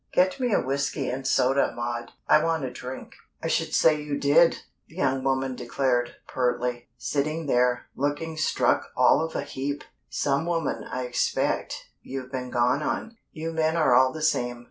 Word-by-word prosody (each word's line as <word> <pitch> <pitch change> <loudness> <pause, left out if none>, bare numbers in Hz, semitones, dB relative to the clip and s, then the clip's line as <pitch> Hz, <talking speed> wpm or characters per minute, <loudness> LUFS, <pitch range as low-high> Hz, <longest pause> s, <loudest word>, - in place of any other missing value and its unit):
Get 185 +7 +3
me 250 -2 0
a - - +4
whiskey 135 +1 -1
and 135 +1 -4
soda, 135 0 +2
Maud. 120 0 -4 0.2
I 155 - +5
want 165 -2 0
a 125 - -4
drink." 125 +1 -8 0.3
"I - - 0
should - - 0
say 155 -2 +4
you 145 -1 -3
did!" 145 +4 +4 0.3
the 160 - -18
young 130 -7 0
woman 135 0 0
declared, 120 0 0
pertly. 125 -1 -1
"Sitting 155 +3 -1
there, 125 -2 +2
looking 145 +4 -2
struck 155 - +1
all - - +5
of 160 - -5
a - - -1
heap! 140 +2 -4 0.3
Some 145 +3 0
woman, 165 -2 -1
I 130 - -4
expect, 125 0 -1
you've 130 -1 -7
been 130 -2 -4
gone 125 +4 +2
on. 225 +8 -3
You 165 +1 -4
men 160 0 +1
are 155 -6 +4
all 130 +1 +5
the 155 +1 -6
same. 120 -5 +1
135 Hz, 175 wpm, -26 LUFS, 125-155 Hz, 0.3 s, I